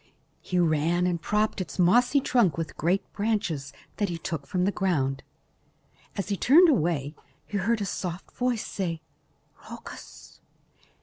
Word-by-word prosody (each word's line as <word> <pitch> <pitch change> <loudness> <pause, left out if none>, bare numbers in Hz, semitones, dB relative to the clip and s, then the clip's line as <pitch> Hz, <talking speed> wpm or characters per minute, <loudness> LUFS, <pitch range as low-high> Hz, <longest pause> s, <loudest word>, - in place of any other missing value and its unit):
He 180 - -2
ran 170 +1 +2
and 175 -2 0
propped 210 +1 0
its 185 - -6
mossy 240 +10 +4
trunk 225 - +2
with 165 -1 -4
great 180 +5 +1
branches 200 -10 -1 0.3
that 205 -2 0
he 170 - -3
took 160 -4 -5
from 180 -1 0
the 200 - +2
ground. 135 -10 0 1.0
As 195 0 -3
he 200 - +1
was - - -12
turning 330 +7 +7
away, 155 - +1 0.3
he 205 - -3
heard 220 +3 +1
a - - 0
soft 180 -1 -5
voice 245 -3 -1
say, 165 -5 -3 0.7
"Rhoecus." - - -11
180 Hz, 150 wpm, -27 LUFS, 165-210 Hz, 1.0 s, turning